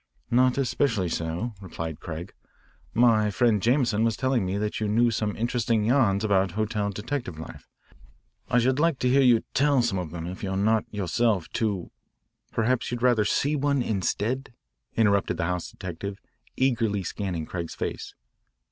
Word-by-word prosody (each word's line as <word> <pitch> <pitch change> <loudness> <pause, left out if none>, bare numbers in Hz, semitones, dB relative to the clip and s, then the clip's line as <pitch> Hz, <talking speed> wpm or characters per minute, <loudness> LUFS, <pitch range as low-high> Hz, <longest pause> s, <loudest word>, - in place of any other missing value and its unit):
"Not 125 +2 +4
especially 120 -7 +1
so," 85 +9 -3
replied 80 -4 -6
Craig. 85 +2 -7 0.6
"My 110 -3 +4
friend 105 0 +2
Jameson 120 -2 +2
was 115 -1 +1
telling 130 -2 +1
me 95 +2 -1
that 105 +1 -2
you 110 - -1
knew 115 +3 +3
some 105 -2 -1
interesting 115 -1 0
yarns 110 -4 +3
about 95 -4 +2
hotel 105 -1 -1
detective 105 - -4
life. 80 - -10 0.8
I 125 - +3
should 130 +3 +2
like 165 -2 +2
to 125 - +1
hear 135 +2 +5
you 120 -4 +5
tell 140 -2 +3
some 100 -6 0
of 90 -3 -4
them, 85 0 -6
if 90 +2 -6
you 100 - -3
are 95 - -1
not 110 +2 +2
yourself 105 -1 0
too 105 -7 -2 0.3
" - - -48
"Perhaps 120 +2 0
you'd 120 0 -4
rather 120 -4 +4
see 145 +6 +1
one 140 -2 +1
instead?" 110 +6 -1 0.5
interrupted 100 -5 +2
the 85 - 0
house 90 0 -2
detective, 95 +2 -6 0.4
eagerly 115 -6 +1
scanning 90 -3 -3
Craig's 85 -1 -5
face. - - -5
110 Hz, 165 wpm, -26 LUFS, 95-120 Hz, 0.8 s, hear